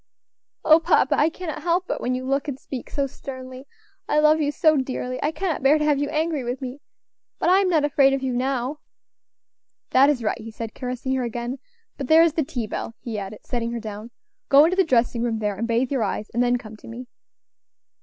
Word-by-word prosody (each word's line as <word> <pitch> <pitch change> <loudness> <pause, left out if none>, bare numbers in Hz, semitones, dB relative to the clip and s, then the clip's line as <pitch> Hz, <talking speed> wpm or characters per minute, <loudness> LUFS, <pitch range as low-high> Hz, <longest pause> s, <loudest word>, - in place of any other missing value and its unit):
"O 315 +1 +7
papa! 330 - +3
I 300 - +3
cannot 330 -2 -6
help 350 +2 0
it, - - -3
when 250 +1 -1
you 255 0 -4
look 275 +2 -1
and 275 -3 -3
speak 265 -2 -8
so 280 - -1
sternly. 260 0 -9 0.4
I - - +2
love 305 +1 +4
you 290 -1 +1
so 310 +1 +3
dearly 255 -2 -3
I 300 - +1
cannot 355 -1 -2
bear 275 +3 +5
to 300 - -1
have 295 -2 +2
you 290 0 -1
angry 310 -2 -1
with 245 +2 -3
me; 260 +2 -7 0.6
but - - +1
I 375 +2 +6
am 390 -2 +2
not 315 -4 +3
afraid 275 -2 +4
of 270 0 -1
you 260 -1 -1
now." 260 +3 -1 1.1
"That 275 +2 +6
is 265 -5 0
right," 225 +2 -1
he 225 - -8
said, 225 0 -7
caressing 255 +1 -4
her 260 -1 0
again. 240 +2 -4 0.4
"But 270 - -4
there 320 +3 +7
is 335 -3 +2
the 315 - +1
tea 245 -4 -4
bell," 225 +1 -5
he 225 -3 -5
added, 200 +1 -8
setting 235 -1 -3
her 235 - -3
down. 215 0 -7 0.4
"Go 280 +1 +8
into 340 +4 +2
the 380 - +4
dressing 240 -5 +1
room 235 -2 0
there, 210 -1 -1
and 230 +4 -3
bathe 240 +3 0
your 270 -4 0
eyes, 210 0 -3
and 240 - +1
then 245 0 +2
come 220 -3 -11
to - - -15
me." 235 +3 -8
260 Hz, 230 wpm, -23 LUFS, 240-300 Hz, 1.1 s, Go